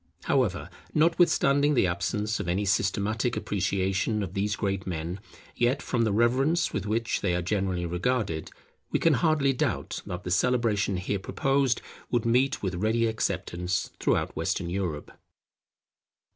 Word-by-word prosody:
However, 100 -10 0 0.2
notwithstanding 150 -3 +3
the 120 - +4
absence 105 +5 -1
of - - -4
any 95 +4 0
systematic 100 +4 0
appreciation 100 +2 0
of 90 -2 -6
these 100 +1 0
great 95 -2 -2
men, 85 +2 -4 0.4
yet 120 +4 +2
from 120 -3 0
the 110 - +1
reverence 130 +10 +2
with - - -2
which 115 +2 0
they 90 -3 +1
are 90 - 0
generally 95 -2 -1
regarded, 90 -1 -1 0.4
we - - +1
can 165 - +3
hardly 145 -2 +2
doubt 125 - -2
that 90 0 -5
the 90 - -4
celebration 105 -2 +1
here 95 +2 -2
proposed 135 +3 0 0.3
would 120 -2 0
meet 125 +3 +2
with 95 -1 -1
ready 110 +6 +1
acceptance 90 -5 -2
throughout - - 0
Western 85 - -2
Europe. 90 -6 -3
105 Hz, 145 wpm, -27 LUFS, 95-125 Hz, 0.4 s, the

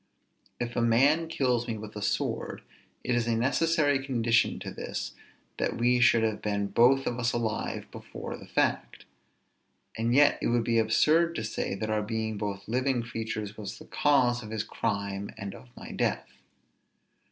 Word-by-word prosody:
If 120 0 -3
a 120 - +1
man 135 +8 +4
kills 125 -6 0
me 115 -2 -3
with 105 0 -9
a 105 - -5
sword, - - -2 0.4
it 125 - 0
is 120 -1 +1
a 115 - +2
necessary 145 +3 +2
condition 120 -3 +2
to - - -6
this - - -5 0.5
that - - -1
we 125 +1 +3
should 120 -1 +5
have 110 -1 -1
been 100 -1 -1
both 135 +5 +4
of 120 - -2
us 120 -1 +1
alive 110 -2 -2
before - - -7
the - - -12
fact; - - -1 0.9
and 115 +2 0
yet 145 +1 +5
it - - +1
would 120 -1 +2
be 115 0 +2
absurd 160 +10 +3
to - - -2
say 110 -2 -3
that 110 +2 -3
our 110 0 +1
being 110 0 -3
both 100 -1 -4
living 125 +1 0
creatures 110 -2 -4
was 105 -3 -6
the - - -12
cause 125 -4 +2
of 110 - -9
his 110 -1 -2
crime 100 -1 -3
and 100 -1 -6
of 130 - -13
my - - -9
death. - - -1
115 Hz, 175 wpm, -28 LUFS, 110-125 Hz, 0.9 s, should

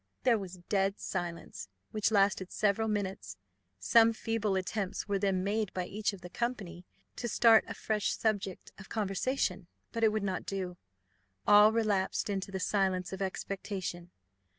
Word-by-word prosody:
There 235 -4 +4
was 190 -2 -7
a 180 - -17
dead 195 +2 0
silence, 170 - -5 0.2
which 215 -1 +1
lasted 195 -3 +2
several 215 +1 +1
minutes: 195 - -3 0.4
some 225 - +5
feeble 220 -3 -1
attempts 190 +2 -2
were 200 -1 0
then 190 -2 +1
made 210 0 0
by 180 -1 -1
each 210 +3 -1
of 200 -3 -10
the 180 - -9
company 195 -8 -4 0.3
to 240 - -3
start 225 -1 +6
a - - -6
fresh 215 -2 -1
subject 205 -4 -2
of 195 - -11
conversation; 200 -2 -1 0.2
but 230 -1 -2
it 220 - +5
would 215 -1 -1
not 190 -2 -2
do 185 -2 -3 0.7
all 210 +1 +8
relapsed 210 -3 0
into 195 -1 -3
the 190 - -3
silence 190 -2 0
of 190 - -5
expectation. 190 -2 -4
195 Hz, 160 wpm, -31 LUFS, 185-215 Hz, 0.7 s, all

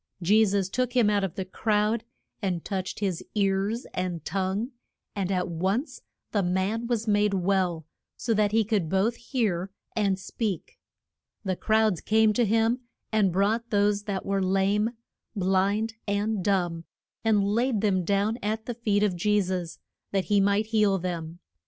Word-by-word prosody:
Je 205 +5 +4
sus 200 -2 +1
took 250 +5 -1
him 235 -5 +4
out 205 -1 +2
of 190 -4 -3
the 190 - -3
crowd, 210 +3 0 0.4
and 180 -5 -2
touched 190 0 -3
his 185 -4 -1
ears 200 +3 +1
and 180 -3 -3
tongue, 195 - -1 0.4
and 195 -2 -1
at 180 -2 0
once 190 - -2 0.3
the 205 - +2
man 190 +6 0
was 230 -2 -1
made 205 -1 +3
well, 180 -3 0 0.3
so 235 - 0
that 210 -1 +2
he 225 +1 +3
could 200 -6 0
both 195 +6 +2
hear 215 -8 -1 0.3
and 200 -3 +1
speak. 195 -1 -4 0.7
And 185 -2 -1
crowds 220 -5 +2
came 220 0 +3
to 240 +2 +2
him, 225 +3 +2 0.3
and 210 -4 +3
brought 215 +6 +1
those 205 0 +2
that 195 -2 -3
were 195 0 0
lame, 195 +3 +2 0.5
blind, 200 +3 +1
and 205 0 0
dumb, 175 -4 0 0.4
and 215 -3 +3
laid 225 +2 +1
them 190 -4 +2
down 205 +5 +1
at 220 +1 -2
the 240 - -3
feet 210 -3 +1
of 200 -4 +1
Je 210 +4 +2
sus, 180 -3 -3 0.3
that 195 -2 0
he 200 - +5
might 200 +2 +2
heal 210 -3 +4
them. 170 -2 -4
200 Hz, 165 wpm, -27 LUFS, 190-220 Hz, 0.7 s, he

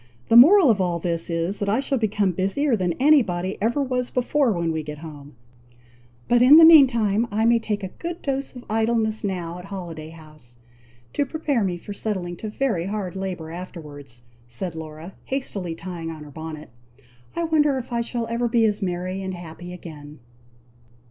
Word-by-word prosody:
the 225 - +4
moral 310 - +8
of 200 -3 0
all 175 -2 0
this 170 0 -2
is, 170 +4 -2
that 205 - -1
I 220 +5 +2
shall 275 -1 -1
become 210 -3 +1
busier 195 - 0
than 180 -4 -1
any 290 - +5
body 185 -2 -3
ever 240 +7 +1
was 250 -2 -2
before, 255 +1 +1
when 170 -4 -1
we 160 0 -2
get 150 0 -7
home; 145 -3 -11 0.9
but 240 0 +4
in 270 +5 +9
the 325 - +10
meantime, 235 -9 +6
I 215 +2 0
may 235 0 +4
take 210 -2 -3
a 190 - -4
good 340 - -7
dose 275 -1 -3
of 245 - -10
idleness 220 0 0
now 180 -3 -3
at 180 - -10
Holiday 170 -5 -7
House, 155 -7 -15 0.6
to - - +1
prepare 285 -4 -1
me 180 -2 -1
for 205 +4 -8
settling 190 -4 -3
to 215 - -6
very 210 -7 -1
hard 195 -3 -4
labour 185 -4 -5
afterwards," 145 -8 -9 0.2
said 160 +9 -3
Laura, 160 +2 -9
hastily 200 -11 -3
tying 170 -1 -6
on 155 -2 -8
her 150 - -12
bonnet. 155 -2 -8 0.6
"I 340 - -1
wonder 300 -4 +2
if 255 -1 -6
I 235 - +1
shall 235 0 -3
ever 235 +1 -1
be 230 -1 +3
as 210 -1 0
merry 185 +1 -3
and 190 -1 -4
happy 175 +1 -9
again!" 150 -4 -10
195 Hz, 190 wpm, -23 LUFS, 165-235 Hz, 0.9 s, the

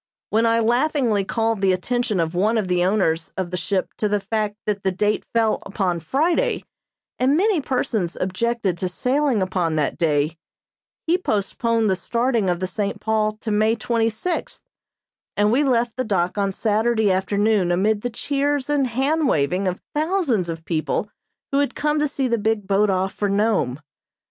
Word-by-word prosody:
When 225 +2 +3
I 230 0 +3
laughingly 240 -2 +2
called 225 +1 -1
the 190 -1 +3
attention 220 +2 -1
of 165 0 0
one 210 +6 +2
of 210 -4 0
the 180 -1 +1
owners 175 -4 +1
of 185 -2 -3
the - - -2
ship 185 +2 -2
to 210 - +1
the 205 0 +1
fact 210 +1 -2
that 205 -2 -1
that 190 -1 -1
date 210 +1 +1
fell 225 -2 +1
upon 190 -3 -1
Friday, 325 - 0 0.6
and 270 +4 +3
many 390 -3 +2
persons 235 -10 -1
objected 190 -1 -1
to 185 - -1
sailing 250 +3 +1
upon 180 -4 -1
that 150 -2 -1
day, 155 0 +1 0.7
he 345 +3 +2
postponed 225 - 0
the 190 - +2
starting 235 0 0
of 175 -1 0
the 185 - -1
"St. 200 +2 -3
Paul" 215 -1 0
to 220 - -3
May 215 +2 +3
twenty 225 0 0
sixth, 330 +11 -4 0.7
and 210 +1 +3
we 265 +5 +3
left 240 -4 +1
the 255 - -1
dock 185 -6 0
on 200 -1 0
Saturday 220 +1 +1
afternoon 200 0 +1
amid 205 +4 +1
the 245 - -2
cheers 285 +3 -1
and 280 -3 +2
hand 275 +6 +1
waving 180 - +1
of 180 0 -2
thousands 300 - 0
of 165 0 -6
people 170 +5 -2 0.4
who 275 - +2
had 285 - 0
come 300 0 0
to 300 - +2
see 275 -2 -1
the 235 -2 0
big 220 -1 0
boat 200 +2 +2
off 190 0 0
for 205 - -1
Nome. 200 - +1
215 Hz, 180 wpm, -22 LUFS, 190-245 Hz, 0.7 s, When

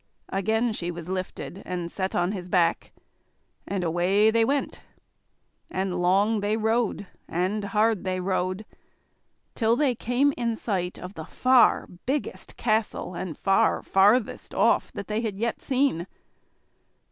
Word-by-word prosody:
Again 220 +4 0
she 175 -4 -3
was 175 0 -7
lifted 185 0 -5
and 175 -2 -4
set 190 -1 -3
on 175 +2 +1
his 185 -3 -6
back, 175 -2 +1 0.8
and 195 -2 -2
away 180 +6 +3
they 230 0 +3
went. 275 +4 -1 0.9
And 185 -1 -2
long 200 +5 +3
they 205 +2 0
rode, 220 -2 0 0.2
and 190 +5 -1
hard 215 0 +1
they 185 -1 -1
rode, 185 +2 -1 0.9
till 225 -1 +2
they 270 -1 +2
came 245 +5 +1
in 235 -2 -1
sight 185 -5 -2
of 180 +2 -8
the 160 -5 -7
far 255 +5 +4 0.2
biggest 280 +2 -3
castle 215 -5 -1
and 175 -2 -5
far 195 -1 +2
farthest 205 +4 +2
off, - - +3
they 210 +2 -3
had 215 -4 -3
yet 230 +2 -2
seen. 260 - 0
200 Hz, 135 wpm, -26 LUFS, 185-225 Hz, 0.9 s, far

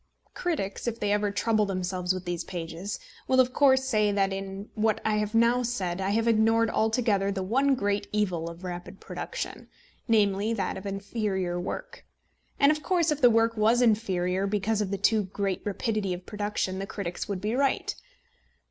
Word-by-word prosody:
Critics, 280 - -3
if 230 -1 -2
they 205 -1 0
ever 205 0 +2
trouble 210 +1 +1
themselves 185 -1 -1
with 185 0 -3
these 175 -1 -2
pages, 175 +3 -5 0.3
will, 260 0 +3
of 255 0 +4
course, 265 -2 +5
say 215 -6 +2
that 195 -1 +1
in 195 +1 -6
what 215 -1 +1
I 215 -1 +2
have 210 +1 -1
now 235 +2 +4
said 195 -7 -2
I 190 - 0
have 225 +3 +1
ignored 225 0 +3
altogether 220 -3 +1
the 195 -1 -2
one 270 +8 +2
great 200 -3 -1
evil 185 -6 0
of 170 +2 -11
rapid 180 +1 -7
production, - - -6 0.4
namely, 210 -1 +2
that 195 -5 -2
of 190 +1 -6
inferior 195 -3 -2
work. - - -6 0.6
And 280 +1 +6
of 305 0 -1
course 345 -3 +1
if 300 0 -1
the 245 - +8
work 230 0 +3
was 220 +3 +3
inferior 195 -5 +1
because 210 +1 0
of 205 - -1
the 200 - -2
too 215 0 +2
great 195 0 -2
rapidity 205 -2 -1
of 180 +1 -11
production, 205 -3 -2
the 195 - -4
critics 200 -3 -5
would 200 -2 -2
be 210 +4 -2
right. 275 +2 +1
205 Hz, 185 wpm, -27 LUFS, 190-230 Hz, 0.6 s, the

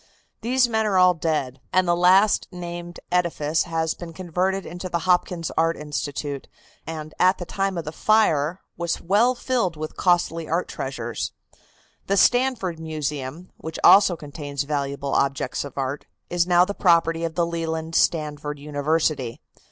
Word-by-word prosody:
These 250 +2 +3
men 220 -2 0
are 195 -3 +2
all 180 0 +6
dead, 150 -6 -2
and 185 -1 +3
the 175 - +3
last 185 +4 +4
named 175 -1 -7
edifice 165 -3 +1
has 165 -1 -1
been 170 -2 -9
converted 185 +2 -1
into 175 +2 -6
the 170 -1 -2
Hopkins 180 -2 +1
Art 165 +1 +2
Institute, 145 -1 -4 0.4
and 155 -1 -6
at 185 +1 +4
the 175 - -6
time 195 +1 -2
of 165 - -4
the 155 - -4
fire 175 -4 +2
was 170 0 -2
well 215 +8 +3
filled 240 -10 -1
with 155 0 -6
costly 170 -2 +1
art 170 +3 0
treasures. 120 -4 -4 0.7
The 200 - +1
Stanford 245 -9 +2
Museum, 155 0 -5
which 160 0 -7
also 195 -3 +7
contains 145 -2 -5
valuable 140 -1 -2
objects 135 -2 0
of 140 - -10
art, 135 +1 -3 0.2
is 175 0 +1
now 175 0 +5
the 200 - -4
property 165 -3 +3
of 165 -1 -3
the 170 - +2
Leland 165 -1 -3
Stanford 150 -3 0
University. 145 -3 -1
165 Hz, 155 wpm, -23 LUFS, 150-180 Hz, 0.7 s, also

